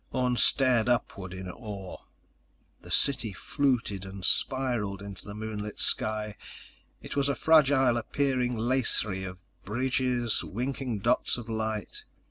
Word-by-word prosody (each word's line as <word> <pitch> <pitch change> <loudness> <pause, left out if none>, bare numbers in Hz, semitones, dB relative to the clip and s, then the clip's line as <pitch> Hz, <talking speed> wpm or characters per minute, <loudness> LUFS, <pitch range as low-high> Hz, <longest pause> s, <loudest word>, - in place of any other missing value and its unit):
Orne 125 -1 0
stared 125 -1 +3
upward 100 -6 -2
in 95 0 -7
awe. 100 -1 -8 0.8
The - - -13
city 120 -7 +3
fluted 120 -4 -1
and 95 -1 -6
spiraled 120 -7 +3
into 100 -1 -9
the 105 - -7
moonlit 105 -1 -6
sky. 105 -1 +1 0.7
It - - -7
was 140 0 +1
a 140 - 0
fragile 140 -6 +4
appearing 125 0 -1
lacery 110 -5 +2
of 95 0 -8 0.3
bridges, 125 +1 0
winking 125 -1 -4
dots 120 +4 +1
of 120 -2 -8
light. 110 -2 -3
115 Hz, 125 wpm, -28 LUFS, 105-130 Hz, 0.8 s, fragile